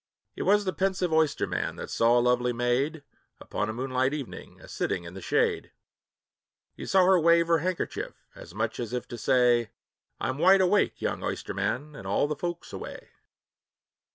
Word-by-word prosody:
It - - -6
was 205 +1 +3
the 185 - -1
pensive 190 -3 0
oysterman 160 -2 0
that - - -7
saw 115 +1 +3
a - - +5
lovely 125 0 +2
maid, 125 +6 0 0.4
Upon 105 - -3
a - - -3
moonlight 130 +3 0
evening, 140 -5 -8
a - - -14
sitting 85 - -2
in 85 0 -9
the 95 - -8
shade; - - 0 1.0
He - - -8
saw 190 -1 +4
her 185 -1 +5
wave 170 +1 +4
her 165 -1 +4
handkerchief, 180 +2 -3 0.2
as 90 - -13
much 110 +1 -2
as 120 -1 -4
if 125 - -3
to 120 - -6
say, 120 -2 +3 0.5
"I 130 - -2
'm 130 +2 -3
wide 190 +3 +6
awake, 190 +2 +2
young - - -2
oysterman, 150 +4 -3
and 100 - -8
all 100 - +2
the 150 - -2
folks 175 +3 -5
away." - - -8
135 Hz, 180 wpm, -27 LUFS, 120-170 Hz, 1.0 s, wide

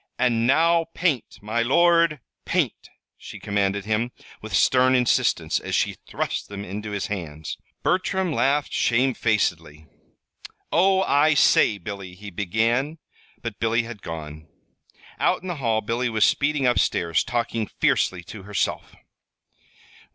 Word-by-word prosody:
"And 115 -2 +2
now 165 +4 +3
paint, 155 -9 -1
my 110 +3 -1
lord, 165 +3 +3 0.2
paint!" - - -1 0.3
she - - -10
commanded 100 -1 -1
him, 110 +3 -1 0.3
with 110 - -8
stern 130 0 +4
insistence, 125 -1 +2
as - - -3
she - - +1
thrust - - -3
them 100 0 -6
into 105 +3 -6
his 100 -1 -3
hands. 80 -6 -6 0.2
Bertram 185 -1 0
laughed 140 +1 +1
shamefacedly. 105 - 0 0.9
"Oh, 190 +2 +3
I 145 0 +3
say, 110 -6 +4
Billy," 95 -1 -8
he 100 +2 -10
began; 115 - 0 0.5
but 115 -3 -5
Billy 115 +1 +1
had 115 -3 -9
gone. 80 -1 -8 0.7
Out - - +1
in - - -7
the 175 -3 -3
hall 115 -5 0
Billy 120 +3 -1
was 110 -2 +3
speeding 140 -1 +1
up 125 -1 +3
stairs, 85 -2 +1
talking 115 -2 -2
fiercely 90 -2 0
to 100 +4 -10
herself. 100 +1 -3
115 Hz, 135 wpm, -24 LUFS, 100-140 Hz, 0.9 s, stern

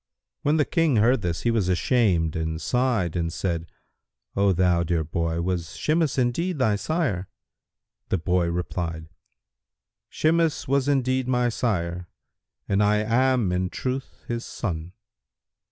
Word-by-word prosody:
When 150 +2 +2
the 150 - +3
King 165 -6 +2
heard 115 +3 +4
this, 85 -2 -2
he 120 - +1
was 105 -5 +1
ashamed 90 - +2
and 80 0 -2
sighed 120 -7 0
and 85 -1 -1
said, 85 -2 -2 0.7
"O 100 0 +3
thou 90 -1 +3
dear 85 -1 0
boy, 85 +1 -2
was 85 -3 -3
Shimas 155 -2 +1
indeed 150 +8 0
thy 110 -6 +2
sire?" 115 - -1 0.8
The - - +2
boy 90 +1 +1
replied, 85 -2 -3 1.0
"Shimas 165 0 +1
was 140 0 +1
indeed 130 -2 +1
my 125 -1 +2
sire, 90 -7 -2 0.6
and 100 +1 +2
I 105 0 +4
am 120 -2 +2
in 90 0 0
truth 130 +5 -4
his 120 0 -3
son." 85 -4 -5
100 Hz, 135 wpm, -25 LUFS, 85-130 Hz, 1.0 s, heard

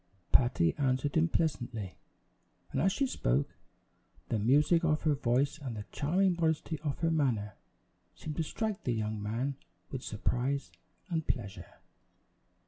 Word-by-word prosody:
Patty 100 -10 +4
answered 135 +1 +1
him 165 +1 +4
pleasantly, 120 - -1 0.8
and 135 - 0
as 190 +4 +4
she 275 - +1
spoke, 65 - 0 0.7
the 110 - +1
music 145 +9 +4
of 155 -2 +2
her 155 -2 +4
voice 135 +2 +1
and 130 -6 -5
the 105 - -5
charming 180 +5 +2
modesty 160 -1 0
of 150 -2 -2
her 165 0 +2
manner 120 -10 +1 0.6
seemed 150 -1 -6
to 165 - +1
strike 215 +5 -3
the 125 - 0
young 110 -1 -2
man 120 +6 -2 0.3
with 130 - -4
surprise 125 +5 -1 0.4
and 160 -2 -1
pleasure. 100 -7 -4
140 Hz, 140 wpm, -32 LUFS, 115-160 Hz, 0.8 s, Patty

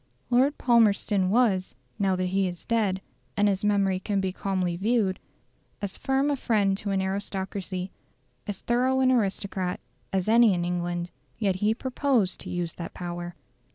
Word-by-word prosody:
Lord 265 +4 +3
Palmerston 205 -5 +3
was 200 -4 +2 0.2
now 195 -2 +2
that 185 0 -1
he 190 +1 +1
is 175 -1 -7
dead, 205 -5 0 0.3
and 205 0 +4
his 195 +1 0
memory 200 -2 +2
can 200 +1 -1
be 190 -1 -1
calmly 185 -2 -1
viewed 205 0 +1 0.6
as 200 -2 -3
firm 270 +2 +1
a - - +1
friend 210 -7 +1
to 210 - -4
an 195 -1 +1
aristocracy, 190 -1 -3 0.6
as 205 -2 -4
thorough 255 +2 +2
an 260 0 +4
aristocrat, 195 -5 -1 0.3
as 190 0 0
any 225 -2 +6
in 175 0 -1
England; 175 0 -2 0.3
yet 195 -4 0
he 210 +3 +1
proposed 255 -5 0
to - - -8
use 175 -2 -3
that 170 - -8
power. 175 0 -5
195 Hz, 160 wpm, -27 LUFS, 185-225 Hz, 0.6 s, any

